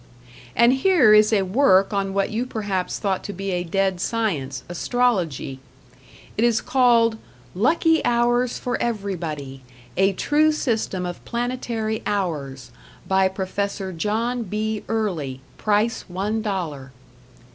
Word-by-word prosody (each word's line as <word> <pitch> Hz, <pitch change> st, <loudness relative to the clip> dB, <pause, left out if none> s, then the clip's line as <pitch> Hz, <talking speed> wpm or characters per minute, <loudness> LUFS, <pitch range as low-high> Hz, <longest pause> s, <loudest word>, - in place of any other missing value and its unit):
And 235 Hz, +2 st, +5 dB
here 270 Hz, -, +5 dB
is 215 Hz, +1 st, +6 dB
a 205 Hz, -3 st, +3 dB
work 195 Hz, -1 st, +3 dB
on 195 Hz, -1 st, -1 dB
what 195 Hz, 0 st, +1 dB
you 225 Hz, +3 st, -1 dB
perhaps 205 Hz, -6 st, -2 dB
thought 195 Hz, -2 st, -1 dB
to 205 Hz, -, -5 dB
be 195 Hz, +1 st, -4 dB
a 175 Hz, -1 st, -1 dB
dead 190 Hz, +1 st, 0 dB
science, 160 Hz, -, -2 dB
Astrology. 175 Hz, -, -1 dB, 0.8 s
It 220 Hz, -, 0 dB
is 235 Hz, -2 st, +3 dB
called 240 Hz, -3 st, +3 dB, 0.3 s
"Lucky 320 Hz, -, +2 dB
Hours 240 Hz, +1 st, +2 dB
for 245 Hz, -, -3 dB
Everybody: 165 Hz, -, -3 dB, 0.4 s
A 195 Hz, +1 st, +3 dB
True 300 Hz, +9 st, +2 dB
System 220 Hz, -10 st, -1 dB
of 175 Hz, 0 st, -6 dB
Planetary 235 Hz, -2 st, -2 dB
Hours 140 Hz, -11 st, -3 dB, 0.4 s
by 190 Hz, 0 st, +3 dB
Prof. 190 Hz, 0 st, -3 dB
John 225 Hz, +7 st, -1 dB
B. 215 Hz, +1 st, -3 dB
Early. 175 Hz, -13 st, -2 dB, 0.2 s
Price 215 Hz, +2 st, +1 dB
One 200 Hz, +4 st, -2 dB
Dollar." 165 Hz, -10 st, -4 dB
205 Hz, 125 wpm, -23 LUFS, 185-235 Hz, 0.8 s, is